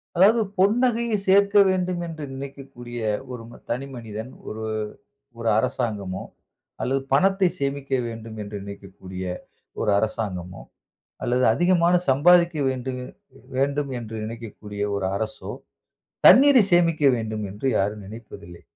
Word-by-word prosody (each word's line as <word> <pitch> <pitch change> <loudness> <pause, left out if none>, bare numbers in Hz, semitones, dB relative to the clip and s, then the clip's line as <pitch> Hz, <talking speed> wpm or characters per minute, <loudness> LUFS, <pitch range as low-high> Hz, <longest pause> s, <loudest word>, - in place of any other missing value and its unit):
அதாவது, 200 +6 +6 0.2
பொன்னகையை 230 +2 +2
சேர்க்க 200 +2 +5
வேண்டும் 180 -1 0
என்று 160 -2 -7
நினைக்கக்கூடிய 135 -3 -8 0.3
ஒரு 120 -2 -7 0.3
தனி 135 +4 -2
மனிதன், 115 +1 -7 0.2
ஒரு, 110 +1 -5 0.7
ஒரு 115 -1 -1
அரசாங்கமோ 105 -6 -2 0.6
அல்லது 135 +2 0
பணத்தை 195 +5 +4
சேமிக்க 140 0 -3 0.2
வேண்டும் 115 -1 -8
என்று 105 0 -7
நினைக்கக்கூடிய 95 -2 -9 0.6
ஒரு - - 0
அரசாங்கமோ! 95 -5 -3 0.6
அல்லது 125 +1 +1
அதிகமாக 175 +5 +3
சம்பாதிக்க 170 +5 +5
வேண்டு 130 0 -3 0.6
வேண்டும் 140 +1 0
என்று 115 -1 -8
நினைக்கக்கூடிய 105 -2 -7
ஒரு 100 -2 -1
அரசோ! 110 +1 -4 0.8
தண்ணீரை 260 +3 +8
சேமிக்க 165 -3 +3
வேண்டும் 110 -2 -3
என்று 105 +7 -4
யாரும் 105 +1 -1
நினைப்பதில்லை. 100 -5 -11
130 Hz, 110 wpm, -24 LUFS, 110-175 Hz, 0.8 s, தண்ணீரை